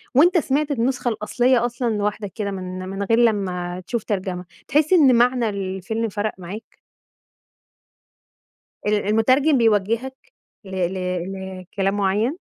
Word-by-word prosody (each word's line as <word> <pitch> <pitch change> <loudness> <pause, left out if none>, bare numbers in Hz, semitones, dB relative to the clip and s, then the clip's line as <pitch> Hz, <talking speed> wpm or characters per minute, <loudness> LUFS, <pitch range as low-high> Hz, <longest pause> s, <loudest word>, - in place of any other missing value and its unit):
وأنت 345 +7 +6
سمعت 295 -1 0
النسخة 250 -1 0
الأصلية 240 +3 +1
أصلًا 240 0 -2
لوحدك 205 -1 -2
كده 205 -2 -3
من 185 -1 -5
من 195 +1 -3
غير 225 +3 +2
لمّا 185 -5 0
تشوف 235 -3 -2
ترجمة. 185 -3 -3 0.2
تحس 305 +4 +2
إن 285 -8 +6
معنى 240 -1 +3
الفيلم 200 +3 -3
فرق 210 +1 -2
معاك؟ 190 +4 -9 2.1
ال 210 - +3
المترجم 255 +8 +3
بيوجهك 230 +4 +1 0.5
ل 190 - -11
ل 185 -1 -1 0.7
لكلام 195 +2 -2
مُعيّن؟ 205 - +1
215 Hz, 125 wpm, -22 LUFS, 195-245 Hz, 2.1 s, وأنت